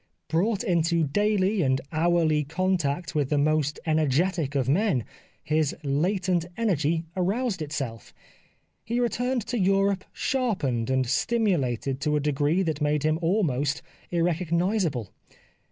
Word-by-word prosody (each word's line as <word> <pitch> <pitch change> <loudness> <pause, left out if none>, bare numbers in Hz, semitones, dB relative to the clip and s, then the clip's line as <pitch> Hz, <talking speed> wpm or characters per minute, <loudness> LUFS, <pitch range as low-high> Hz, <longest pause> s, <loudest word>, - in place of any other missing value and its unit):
Brought 200 +6 +1
into 170 -4 +2
daily 205 +5 +1
and 130 -3 +2
hourly 160 -2 +2
contact 165 -1 -1
with 145 -4 0
the 150 - +1
most 150 0 +1
energetic 155 0 +1
of 130 -3 +1
men, 160 - +2 0.4
his 155 -1 0
latent 175 +5 +1
energy 165 -7 0
aroused 195 +2 -1
itself. 135 -7 -5 0.7
He 235 +2 -1
returned 245 0 0
to 245 - -2
Europe 195 0 +2
sharpened 185 - -1
and 130 0 +2
stimulated 140 - 0
to 150 0 +1
a - - +2
degree 150 +5 +1
that 160 -4 -2
made 150 0 +1
him 155 +1 +1
almost 155 - 0 0.3
irrecognisable. 170 - 0
165 Hz, 120 wpm, -26 LUFS, 145-190 Hz, 0.7 s, into